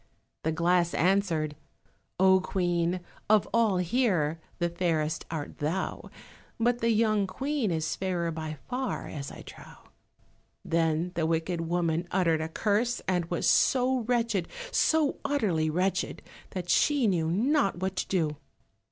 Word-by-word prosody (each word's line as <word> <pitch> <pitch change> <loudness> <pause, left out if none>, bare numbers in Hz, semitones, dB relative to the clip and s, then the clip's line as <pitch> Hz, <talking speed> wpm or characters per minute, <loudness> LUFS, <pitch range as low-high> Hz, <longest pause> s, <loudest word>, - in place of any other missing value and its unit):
the 160 - +1
glass 170 +1 +2
answered— 170 -5 +1 0.6
"Oh, 190 0 +6
Queen, 175 -1 0 0.3
of 215 -2 +4
all 225 -5 +3
here 180 - +1 0.2
the 175 - +1
fairest 165 -3 -1
art 155 -3 -5
thou, 160 +6 -2 0.5
But 240 +1 +2
the 230 - +1
young 215 -3 +2
Queen 270 +2 -1
is 160 -2 -1
fairer 175 -3 -1
by 155 -1 -5
far 255 +1 -3
as 140 -3 -6
I - - -10
trow." - - -12 0.9
Then 165 +1 +1
the 165 -2 0
wicked 165 +1 -1
woman 170 0 0
uttered 165 -4 +2
a 160 - -3
curse, 220 +7 0
and 180 -2 +1
was 170 0 -1
so 260 0 +3
wretched, 230 -6 0 0.2
so 315 - +2
utterly 200 - +1
wretched, 185 +4 -1 0.3
that 180 -2 -5
she 280 +8 +3
knew 170 -6 +1
not 230 - +2
what 190 +1 -2
to - - -1
do. 160 -6 0
180 Hz, 140 wpm, -28 LUFS, 165-215 Hz, 0.9 s, Oh